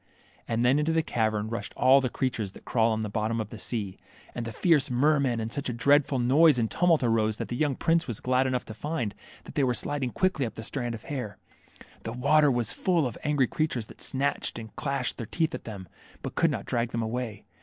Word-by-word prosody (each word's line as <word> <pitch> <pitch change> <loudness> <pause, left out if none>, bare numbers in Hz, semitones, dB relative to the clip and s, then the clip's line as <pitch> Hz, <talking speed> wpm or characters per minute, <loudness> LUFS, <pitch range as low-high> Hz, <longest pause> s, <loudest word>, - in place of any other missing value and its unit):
And 115 +1 0
then 130 +4 +4
into 155 +2 +1
the 160 0 +2
cavern 110 -5 0
rushed 115 - -5
all 135 +2 +6
the 130 - -1
creatures 115 -6 -2
that - - -14
crawl 115 -1 +2
on 110 0 -1
the 110 - -2
bottom 110 +2 -1
of 110 -1 -4
the 115 - -8
sea, 105 -6 -3 0.3
and 120 - -4
the - - -4
fierce 150 -1 +2
mermen, 135 -1 +2
and 115 0 -4
such 140 -2 -3
a - - -2
dreadful 140 +3 +3
noise 140 +4 +5
and 115 -2 0
tumult 170 -5 +3
arose 110 -2 +2
that - - -5
the 120 - -2
young 145 0 +1
prince 165 +4 +1
was 115 -5 -2
glad 130 +1 +2
enough 125 -1 -1
to 110 - -8
find 120 -4 -3 0.3
that - - -11
they 145 -2 +1
were 125 -2 +2
sliding 140 0 -1
quickly 185 +1 0
up 110 - -9
the 110 - -6
strand 120 -1 -3
of 110 - -10
hair. 125 -9 -5 0.6
The 115 - -5
water 145 +4 +4
was 120 -4 0
full 175 -5 +1
of 120 - -3
angry 145 -3 +2
creatures 125 -4 -1
that - - -15
snatched 140 +2 -1
and 110 -2 -9
clashed 140 -3 -1
their 115 - -4
teeth 165 -1 0
at - - -6
them, 100 -5 -7 0.4
but - - -4
could - - +3
not - - -3
drag 115 -1 -1
them 115 - 0
away. 110 -2 -4
125 Hz, 235 wpm, -27 LUFS, 115-145 Hz, 0.6 s, all